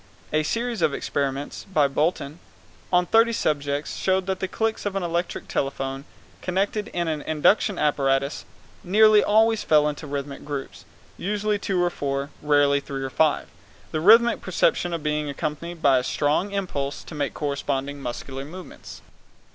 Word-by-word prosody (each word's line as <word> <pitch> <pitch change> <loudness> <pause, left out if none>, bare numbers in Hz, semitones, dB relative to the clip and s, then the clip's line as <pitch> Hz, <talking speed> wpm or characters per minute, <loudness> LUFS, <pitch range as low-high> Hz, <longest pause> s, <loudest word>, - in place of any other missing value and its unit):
A 155 - +3
series 230 +8 -2
of 140 - +2
experiments, 140 0 -3
by 150 -6 +4
Bolton, 150 +1 -1 0.5
on 180 0 +4
thirty 225 +5 +4
subjects 145 -7 -1
showed 190 0 +1
that 190 -1 -2
the 190 - -2
clicks 220 +3 -2
of 205 -1 -3
an 195 - -1
electric 175 +1 -2
telephone 135 0 -3 0.4
connected 200 +3 -1
in 175 -6 -2
an 155 -2 -2
induction 170 +6 +2
apparatus 140 -1 +1 0.4
nearly 215 +3 +6
always 220 +1 +3
fell 150 -1 +4
into 150 +1 -4
rhythmic 140 0 -5
groups, 145 -2 -6 0.3
usually 210 +2 0
of - - -18
two 185 -3 0
or 175 - +1
four, 140 -1 -3
rarely 145 -1 +3
of - - -15
three 135 -1 -4
or 135 - -4
five, 155 +1 +2 0.5
the 155 - -1
rhythmic 230 +6 +6
perception 175 - +1
being 150 -1 -1
accompanied 155 +4 -5
by 135 -2 +5
a - - -4
strong 150 +9 0
impulse 150 -8 -3
to - - -11
make 145 -2 -2
corresponding 140 -1 -2
muscular 135 +2 -5
movements. 175 +5 -11
155 Hz, 160 wpm, -24 LUFS, 140-190 Hz, 0.5 s, nearly